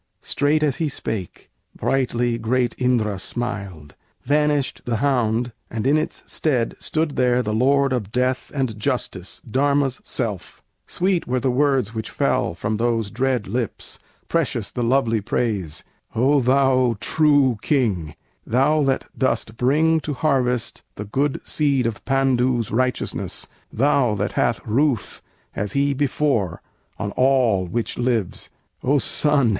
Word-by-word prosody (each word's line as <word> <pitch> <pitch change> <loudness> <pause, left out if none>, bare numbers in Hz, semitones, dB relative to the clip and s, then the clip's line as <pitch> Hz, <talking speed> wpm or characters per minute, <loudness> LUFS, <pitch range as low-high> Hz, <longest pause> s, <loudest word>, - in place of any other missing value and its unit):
Straight 150 +2 +1
as 145 -4 +1
he 160 -2 0
spake, 110 -8 -5 0.2
brightly 120 -3 0
great 120 +1 +1
Indra 115 -6 +1
smiled; 100 -10 -5 0.3
Vanished 145 -1 +1
the 120 - 0
hound, 120 -2 +1 0.2
and 110 -1 -4
in 140 +3 +4
its 155 - -2
stead 125 -7 0
stood 155 -2 -1
there 125 -1 +3
The 105 - -2
Lord 135 +4 +3
of 105 -5 -2
Death 125 +1 0
and 130 -7 -2
Justice, 95 -5 -2
Dharma's 140 +2 +1
self! 105 -7 -3 0.2
Sweet 185 -1 0
were 130 +1 0
the 130 0 +1
words 135 -4 +1
which 110 -1 -4
fell - - 0
from 105 +4 -2
those 115 -2 0
dread 125 -1 0
lips, 115 +2 -3 0.3
Precious 135 -10 -1
the 125 - -3
lovely 115 -3 +2
praise: 95 -8 -1 0.3
"O 135 +5 +4
thou 130 -2 +3
true 145 -7 +3
King, 100 - 0 0.3
Thou 140 +6 +2
that 135 -1 0
dost 125 -4 0
bring 155 +7 +3
to 150 -2 -4
harvest 125 -5 0
the 105 - -6
good 135 +7 0
seed 140 -5 +1
Of 115 -2 -3
Pandu's 130 -3 +1
righteousness; 125 +3 -1 0.2
thou 130 -3 +2
that 105 +3 -1
hast 120 -1 0
ruth 120 0 0 0.3
As 105 0 -2
he 140 0 +2
before, 135 - 0 0.3
on 105 -2 -3
all 125 -8 +2
which 115 +7 -3
lives! 120 -6 -1 0.3
O 140 +3 +2
son! 145 -2 +2
125 Hz, 140 wpm, -22 LUFS, 110-140 Hz, 0.3 s, in